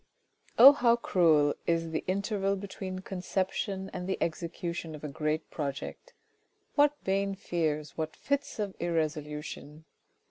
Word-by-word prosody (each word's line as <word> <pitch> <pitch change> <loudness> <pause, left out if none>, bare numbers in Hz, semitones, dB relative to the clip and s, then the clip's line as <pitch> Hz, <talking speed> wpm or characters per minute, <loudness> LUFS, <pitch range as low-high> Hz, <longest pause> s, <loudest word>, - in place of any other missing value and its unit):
Oh, 260 +4 +12
how 245 -4 +4
cruel 160 -10 +3
is 165 -1 +1
the 160 - -2
interval 200 +1 0
between 190 -1 -6
the 185 - -6
conception 190 +1 -2
and 180 +1 -4
the 190 - 0
execution 170 0 -3
of 150 - -11
a - - -2
great 155 +2 -2
project. 140 -3 -5 0.6
What 290 0 +4
vain 195 +1 0
fears, 155 -5 -2
what 155 0 -3
fits 280 0 -2
of 205 -3 -3
irresolution 155 -2 -3
175 Hz, 135 wpm, -30 LUFS, 155-195 Hz, 0.6 s, Oh